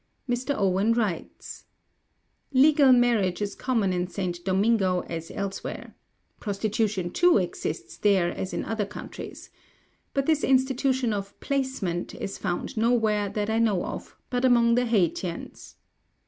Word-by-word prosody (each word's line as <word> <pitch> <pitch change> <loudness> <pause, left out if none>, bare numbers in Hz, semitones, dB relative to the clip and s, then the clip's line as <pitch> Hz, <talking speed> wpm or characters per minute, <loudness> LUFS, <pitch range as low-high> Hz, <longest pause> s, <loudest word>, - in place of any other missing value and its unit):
Mr. 250 +3 -1
Owen 195 +3 +2
writes: 215 -8 -4 0.9
"Legal 280 0 +6
marriage 235 -7 +3
is 205 -1 -2
common 225 -7 0
in 180 0 -1
St. 180 -2 -4
Domingo 190 -1 +2
as 165 -1 -6
elsewhere. 200 -1 -5 0.5
Prostitution, 205 -3 -1
too, 350 - +4
exists 175 -4 -3
there 190 -4 +3
as 190 - -4
in - - -3
other 220 -3 -2
countries. 205 - -9 0.6
But 275 -1 +1
this 310 -1 +2
institution 260 -2 +2
of 200 -1 -5
placement 260 - -2
is 195 - -5
found 175 -3 -3
nowhere, 220 -3 +2
that 210 +1 -2
I 225 - +1
know 210 -6 +2
of, - - -7
but 250 0 0
among 235 -2 +5
the 245 +1 +2
Haytians. 180 -5 -2
210 Hz, 135 wpm, -26 LUFS, 190-245 Hz, 0.9 s, Legal